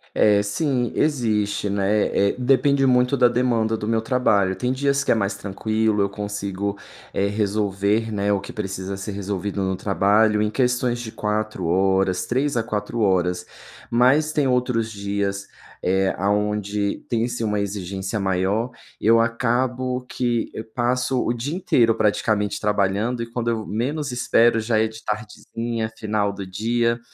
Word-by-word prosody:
É, 105 -1 +4
sim. 120 +4 -1
Existe, 110 -8 0
né, 100 +1 +1 0.2
eh, - - -8
depende 135 +2 +3
muito 125 +1 +3
da 125 -2 +5
demanda 115 -2 +1
do 105 - -5
meu 115 -1 +1
trabalho. 105 -6 +2
Tem 125 0 -1
dias 140 +1 +1
que - - +1
é - - +4
mais 100 -2 -1
tranquilo, 110 +1 0
eu 100 - +1
consigo, 100 -1 -4 0.4
eh, 100 - +1
resolver, 105 +1 0
né, 100 0 0
o 100 - +1
que - - -9
precisa 95 -1 -4
ser 100 +2 -5
resolvido 100 0 -3
no 95 0 0
trabalho 105 +2 +2
em 105 - +1
questões 125 0 0
de 110 -2 -6
4 105 -3 -2
horas 95 +1 +2
3 130 +2 0
a 115 - +1
4 110 +1 -3
horas, 90 -2 +1 0.4
mas 130 +6 +3
tem 145 -3 +2
outros 125 -3 0
dias, 100 -1 -3 0.4
eh, 95 +1 +2
aonde 105 +1 -1
tem, 115 0 0
sim, 120 -1 -4
uma 105 -1 0
exigência 100 +1 -3
maior. 95 +5 0 0.3
Eu 115 +2 +4
acabo 125 +2 0
que 120 -2 -1
eu 110 - -4
passo 125 +1 0
o - - 0
dia 135 +8 -4
inteiro 120 -11 +3
praticamente 105 -1 +1
trabalhando 105 +3 0
e, 115 - -5
quando 120 0 -2
eu 110 -2 -2
menos 140 +6 -2
espero, 120 -2 +3
já 110 0 +1
é 110 - +2
de 110 0 -11
tardezinha, 110 +2 -4
final 105 -2 -1
do 100 -1 -6
dia. 115 +4 0
110 Hz, 160 wpm, -22 LUFS, 100-120 Hz, 0.4 s, da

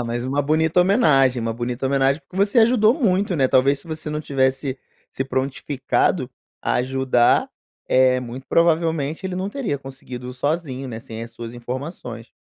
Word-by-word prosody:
Ah, - - -2
mais 120 +1 -3
uma 140 +2 0
bonita 160 +4 +2
homenagem, 150 - +4
uma 115 0 -2
bonita 120 +3 -3
homenagem, 135 +2 +2
porque 185 - -14
você 205 +4 +3
ajudou 225 0 +4
muito, 200 - +1
né, 130 -2 +3
talvez 135 +2 +3
se 165 - -11
você 155 -1 -4
não 150 - -2
tivesse 135 -1 0 0.3
se 135 - -3
prontificado 135 0 -1 0.3
a - - -1
ajudar, 130 -1 +2 0.4
eh, 130 0 +4
muito 125 +2 -8
provavelmente 165 -1 +1
ele 180 -1 -4
não 190 +2 -2
teria 220 - -2
conseguido 130 -2 -8
sozinho, 135 -1 -2
né, 115 -2 -6
sem 115 0 -8
as 115 - -8
suas 115 0 -8
informações. 120 -2 -7
135 Hz, 170 wpm, -22 LUFS, 125-160 Hz, 0.4 s, homenagem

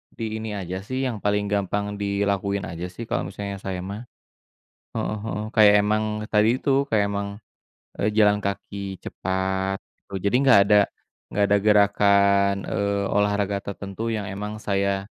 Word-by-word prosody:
di 110 -1 -4
ini 110 -1 -4
aja 95 -1 -4
sih 130 +7 -3
yang 120 -5 -2
paling 105 0 0
gampang 100 +1 -1
dilakuin 100 0 0
aja 85 +1 -5
sih 90 +6 -8
kalau 110 - -2
misalnya 100 +1 -6
saya 95 -2 -4
mah. 100 +5 -7 0.9
Heeh 105 - -2
heeh, 105 -1 -3
kayak 105 -2 +7
emang 105 +1 +1 0.2
tadi 110 +4 +3
itu 140 0 +2
kayak 105 -2 +3
emang, 100 0 -2 0.7
eee, 100 - +1
jalan 105 -1 +4
kaki 100 -1 -4
cepat, 95 +1 -2 0.2
eee, 95 -1 -5
jadi 100 +4 +2
nggak 135 -6 +6
ada 105 +1 +5 0.5
nggak 105 - 0
ada 100 0 +4
gerakan, 100 -1 +4 0.2
eee, 100 0 0
olahraga 105 -1 +1
tertentu 100 +2 -6
yang 100 -3 -4
emang 105 +2 -6
saya, 100 -1 0
100 Hz, 155 wpm, -24 LUFS, 100-105 Hz, 0.9 s, kayak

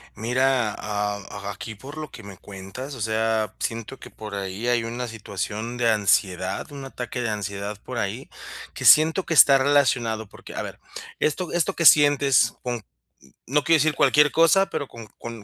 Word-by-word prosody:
Mira, 125 -1 +1
am, 105 -1 -3 0.2
aquí, 105 +2 -6
por 135 +8 -11
lo 155 -2 -6
que 110 - -11
me 100 -2 -11
cuentas, 100 +8 -9
o 120 - -9
sea, 110 -1 0
siento 115 +3 -4
que - - -11
por 105 -1 -10
ahí 100 +4 -4
hay 120 -1 +2
una 120 +2 -4
situación 110 +1 -5
de 120 -1 +2
ansiedad, 95 - 0
un 140 -1 -8
ataque 125 -2 -6
de 115 - -1
ansiedad 100 0 -4
por 130 - -7
ahí. 110 +6 -4 0.4
Que - - -7
siento 160 +4 +6
que 165 - -2
está 140 -2 +8
relacionado, 125 -6 +1
porque, - - -13
a - - -3
ver, - - -9 0.4
esto 165 +3 -1
esto 175 -2 0
que 170 - -1
sientes 145 -4 +5
con 120 -3 -4 0.6
no 145 +3 +1
quiero 165 -1 +4
decir 155 +1 +2
cualquier 150 +2 +4
cosa, 165 +4 +4
pero 140 - -3
con 115 -1 -11
con 115 -3 -8
115 Hz, 180 wpm, -24 LUFS, 105-140 Hz, 0.6 s, está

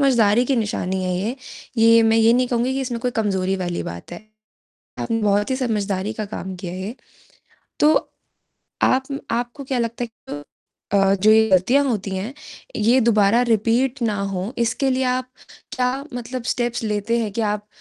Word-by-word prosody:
समझदारी 240 -4 +4
की 270 0 +1
निशानी 190 -4 -1
है 180 0 -1
ये। 220 +8 -2 0.4
ये 230 0 +6
मैं 225 0 +4
ये 225 +1 +5
नहीं 250 0 +2
कहूँगी 245 +1 0
कि 270 - -1
इसमें 245 -3 -3
कोई 250 +1 0
कमज़ोरी 190 -2 0
वाली 175 -2 -3
बात 85 - -8
है। 175 - -7 0.8
आपने 225 -1 -1
बहुत 205 +2 +2
ही 260 - +1
समझदारी 210 -5 -1
का 215 0 -4
काम 190 0 -5
किया 175 -1 -6
है 185 - -6
ये। 215 +7 -5 0.8
तो 300 +1 +6 0.9
आप 265 +2 +2
म 275 - -2 0.2
आपको 245 +3 -7
क्या 260 -1 -1
लगता 235 +1 -2
है - - -5
कि 225 -9 -11
अ 145 - -7 0.5
अ, 195 -1 +4
जो 205 +2 +3
ये 220 0 +5
गलतियाँ 240 +10 +4
होती 210 -7 -1
हैं, 205 +8 -4 0.4
ये 235 +5 +4
दोबारा 220 -1 +4
रिपीट 240 +3 +1
ना 220 -3 +1 0.2
हो 190 +5 -3
इसके 235 +3 +1
लिए 260 0 +1
आप 255 0 -1 0.5
क्या 250 0 +2 0.3
मतलब 245 +1 -5
स्टेप्स 240 -1 -2
लेते 210 +2 0
हैं 215 -3 -2
कि 230 - -2
आप 210 0 -5
225 Hz, 190 wpm, -21 LUFS, 200-250 Hz, 0.9 s, ये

